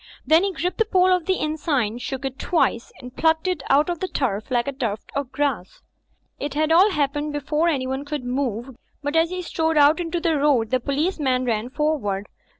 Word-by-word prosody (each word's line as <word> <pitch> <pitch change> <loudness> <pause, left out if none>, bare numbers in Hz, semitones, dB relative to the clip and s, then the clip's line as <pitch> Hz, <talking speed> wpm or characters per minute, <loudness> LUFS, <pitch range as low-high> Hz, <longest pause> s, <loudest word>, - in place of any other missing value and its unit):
Then 320 +3 +5
he 395 - 0
gripped 360 +2 -3
the 450 - +4
pole 370 -3 +3
of 360 -3 -1
the 380 - +3
inn 305 -2 -2
sign, 250 -8 -1
shook 265 +2 -5
it 265 0 -5
twice 315 -9 0
and 250 +1 -11
plucked 320 +2 +2
it 365 -5 -1
out 290 +3 +4
of 350 -2 -2
the 375 - -2
turf 220 - -2
like 240 -1 0
a - - 0
tuft 230 -6 -4
of 280 -2 -3
grass. 275 -11 -2 0.6
It 290 0 -4
had 310 +1 +1
all 365 +6 +6
happened 295 -2 -1
before 300 +3 0
anyone 265 -3 -1
could 290 -2 -4
move, 245 -1 -3 0.3
but 290 +2 -2
as 325 +1 +3
he 365 0 -4
strode 320 -2 0
out 295 +3 +5
into 345 0 -2
the 330 -2 +1
road 265 -6 +2
the 255 - +2
policeman 280 -2 0
ran 230 0 -1
for 300 +3 0
ward. 200 -3 -3
290 Hz, 215 wpm, -23 LUFS, 255-325 Hz, 0.6 s, all